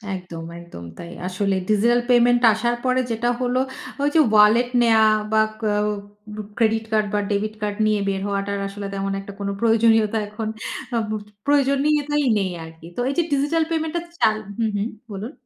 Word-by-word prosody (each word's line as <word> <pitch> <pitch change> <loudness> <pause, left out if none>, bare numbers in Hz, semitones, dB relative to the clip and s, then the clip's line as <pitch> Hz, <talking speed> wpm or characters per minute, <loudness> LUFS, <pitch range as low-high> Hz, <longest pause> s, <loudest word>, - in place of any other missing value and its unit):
একদম, 180 -3 -8 0.2
একদম 170 - -11
তাই। 170 - -8 0.2
আসলে 195 +1 0
ডিজিটাল 230 +3 +3
পেমেন্ট 245 0 +5
আসার 235 +3 0
পরে 255 0 +2
যেটা 230 +2 0
হলো, 250 0 +1 0.4
ওই 285 - +2
যে - - +6
ওয়ালেট 215 +3 +5
নেওয়া, 225 -2 +5 0.2
বা 220 0 +4 0.2
ক - - -17 0.2
অ 210 +1 -5
ক্রেডিট 225 -1 +2
কার্ড 215 -1 +2
বা 210 - +2
ডেবিট 210 +1 -1
কার্ড 205 -1 -2
নিয়ে 215 -1 +2
বের 195 -1 -2
হওয়াটার 200 0 -2
আসলে 200 +1 -7
তেমন 195 0 -2
একটা 200 0 -10
কোনো 200 0 -2
প্রয়োজনীয়তা 225 -1 +3
এখন 215 +1 -5 0.5
আ - - +2
বু 215 - -1 0.3
প্রয়োজনীয়তাই 290 +1 +2
নেই 190 -3 -1
আরকি। 160 0 -12
তো - - 0
এই - - -1
যে 345 - +4
ডিজিটাল 295 +4 +2
পেমেন্টটা 320 +1 -1 0.2
চালু 215 0 +2 0.2
হু, 230 - +2
হু 200 - 0 0.3
বলুন। 205 +5 -5
215 Hz, 175 wpm, -22 LUFS, 200-245 Hz, 0.5 s, যে